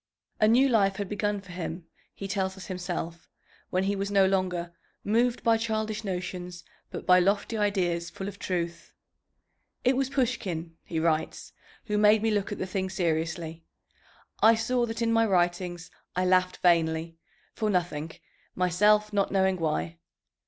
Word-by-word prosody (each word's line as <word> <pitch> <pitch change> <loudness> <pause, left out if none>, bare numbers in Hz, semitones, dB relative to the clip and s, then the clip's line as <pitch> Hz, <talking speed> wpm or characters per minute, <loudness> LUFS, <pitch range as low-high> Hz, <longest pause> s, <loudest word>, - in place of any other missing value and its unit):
A 215 - +5
new 250 +5 +5
life 200 -6 +3
had 200 0 -3
begun 205 0 -1
for 180 -2 -13
him, 175 -1 -5 0.3
he 195 - -6
tells 190 -1 -2
us 190 - -9
himself, 175 -2 -5 0.4
when 185 +1 0
he 200 +1 0
was 200 0 -2
no 200 -1 +4
longer 180 -3 -1 0.3
"moved 235 +3 +1
by 230 -1 +4
childish 220 -1 -2
notions, 180 -2 -5 0.3
but - - -7
by 180 0 +6
lofty 200 +5 +1
ideas 180 -5 0
full 195 - -6
of 200 0 -8
truth." 170 -2 -4 0.9
"It 255 +1 +3
was 265 0 0
Pushkin," 190 - -2
he 165 - -3
writes, 160 -1 -1 0.3
"who 210 -2 0
made 210 +1 +5
me 225 - +2
look 205 -2 -1
at - - -3
the - - -2
thing 190 0 -2
seriously. 165 -2 -2 0.8
I 225 +1 +7
saw 240 +2 0
that 225 +1 -3
in 230 0 +2
my 225 0 +4
writings 175 -1 0 0.2
I 185 0 +1
laughed 185 0 +2
vainly, 165 -1 +2 0.3
for 215 - -1
nothing, 170 -5 -1 0.5
myself 210 +4 +3
not 200 -1 +1
knowing 190 -1 +2
why. 165 0 -2
190 Hz, 160 wpm, -28 LUFS, 175-210 Hz, 0.9 s, I